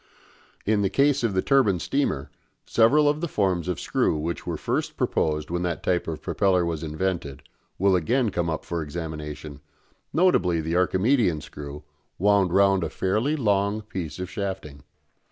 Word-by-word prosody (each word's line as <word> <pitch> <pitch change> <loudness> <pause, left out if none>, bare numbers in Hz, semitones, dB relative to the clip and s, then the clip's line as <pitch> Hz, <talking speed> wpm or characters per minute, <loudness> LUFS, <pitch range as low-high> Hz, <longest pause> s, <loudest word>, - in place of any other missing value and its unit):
In 105 0 +2
the 95 - +1
case 140 +5 +2
of 110 -5 0
the 95 - +1
turbine 130 -9 +3
steamer 80 - -1 0.3
several 145 +7 +4
of 150 +1 +1
the 170 - -1
forms 95 - 0
of 90 - -2
screw - - 0
which 80 +3 -4
were - - -2
first - - -2
proposed 75 0 0
when 85 0 -1
that 85 -2 -2
type 90 -1 0
of 80 -2 -5
propeller 95 -3 +2
was 80 -2 -3
invented 80 -3 -3 0.3
will 95 0 +3
again 115 +7 +1
come 85 -2 -1
up 80 - -3
for 85 -1 -3
examination, 75 -2 -6 0.5
notably 95 - +3
the 80 +2 -2
Archimedean 95 - +2
screw, 75 0 -9 0.3
wound 100 -1 +3
round 95 0 +4
a - - -2
fairly 110 +11 0
long 105 -4 +1
piece 90 -7 -6
of 90 0 -4
shafting. 90 -6 -5
95 Hz, 165 wpm, -25 LUFS, 80-105 Hz, 0.5 s, several